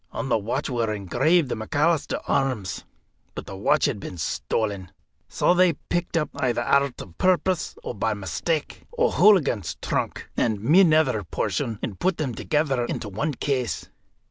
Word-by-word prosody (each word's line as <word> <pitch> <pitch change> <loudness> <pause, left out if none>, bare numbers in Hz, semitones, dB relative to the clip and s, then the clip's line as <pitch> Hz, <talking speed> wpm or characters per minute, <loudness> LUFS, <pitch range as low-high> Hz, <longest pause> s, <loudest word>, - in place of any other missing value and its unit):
On 135 - -4
the 120 - +3
watch 120 +7 -2
were 115 -4 -1
engraved 130 - +2
the - - -1
McAlister 145 +8 0
arms. 115 -9 -1 0.5
But - - -6
the 95 - -8
watch 125 +10 +2
had 135 -8 -1
been 90 - -7
stolen. 95 +4 -2 0.4
So - - +2
they 180 -1 +4
picked 175 +3 -3
up 150 -3 -1
either 120 -2 0
out 140 +3 +4 0.2
of 85 -3 -10
purpose, 185 -1 +1
or - - -4
by 110 0 -1
mistake 105 - -3 0.2
O'Hooligan's 200 - +3
trunk, - - -2
and 110 -3 +1
my 150 - +5
nether 155 - +3
portion, 110 +5 -2
and 100 - -4
put 185 -1 +1
them 135 -6 -2
together 140 0 0
into 110 - -4
one 140 +9 -2
case. 130 -3 -2
130 Hz, 160 wpm, -24 LUFS, 105-155 Hz, 0.5 s, my